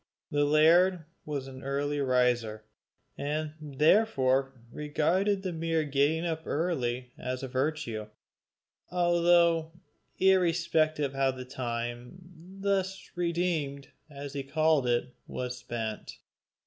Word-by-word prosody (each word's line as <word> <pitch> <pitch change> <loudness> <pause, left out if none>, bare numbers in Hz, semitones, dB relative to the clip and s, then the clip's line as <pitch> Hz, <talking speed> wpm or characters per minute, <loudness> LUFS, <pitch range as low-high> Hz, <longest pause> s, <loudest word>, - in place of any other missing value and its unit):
The 145 0 +2
laird 165 +4 +4 0.2
was 145 -3 -3
an 130 -1 -10
early 145 +2 -1
riser, 125 -5 +1 0.6
and 150 +1 -2
therefore 135 - +2
regarded 175 - 0
the 185 -2 -2
mere 165 -1 0
getting 145 +3 +1
up 160 -2 -2
early 130 -7 -1
as 130 +1 -4
a - - -3
virtue, 130 -5 -2 0.8
altogether 170 -2 +3 0.5
irrespective 165 -6 +2
of - - -16
how 135 0 +2
the 130 -1 -5
time, 120 +2 -4 0.4
thus 195 -1 -1
redeemed, 170 -5 -1 0.2
as 140 -1 -8
he 140 - -3
called 150 0 +2
it, 120 +1 0
was 125 0 -4
spent. 110 -2 -5
145 Hz, 110 wpm, -29 LUFS, 130-170 Hz, 0.8 s, laird